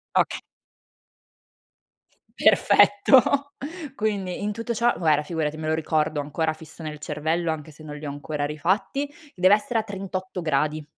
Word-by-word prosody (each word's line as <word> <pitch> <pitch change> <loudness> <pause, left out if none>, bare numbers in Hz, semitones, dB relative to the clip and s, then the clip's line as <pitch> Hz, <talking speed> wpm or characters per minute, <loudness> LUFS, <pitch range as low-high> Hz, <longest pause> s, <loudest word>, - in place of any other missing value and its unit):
Ok - - +3 2.0
Perfetto. 270 +7 +4 0.4
Quindi 200 -5 -2
in 210 0 -1
tutto 230 +2 -3
ciò, 235 +2 +3
guarda, 155 -3 +2
figurati 155 -1 -2
me 155 0 -4
lo 160 - +2
ricordo 155 -1 0
ancora 160 +2 -1
fisso 155 +1 -13
nel 150 -1 -6
cervello, 160 +3 -1
anche 155 0 -7
se 155 +1 -15
non 150 -1 -8
li 150 0 -7
ho - - -3
ancora 145 +1 -4
rifatti, 195 - -1 0.3
deve 185 +2 +5
essere 230 +2 0
a - - -3
38 190 -2 -5
gradi. 155 -1 0
160 Hz, 150 wpm, -24 LUFS, 150-205 Hz, 2.0 s, deve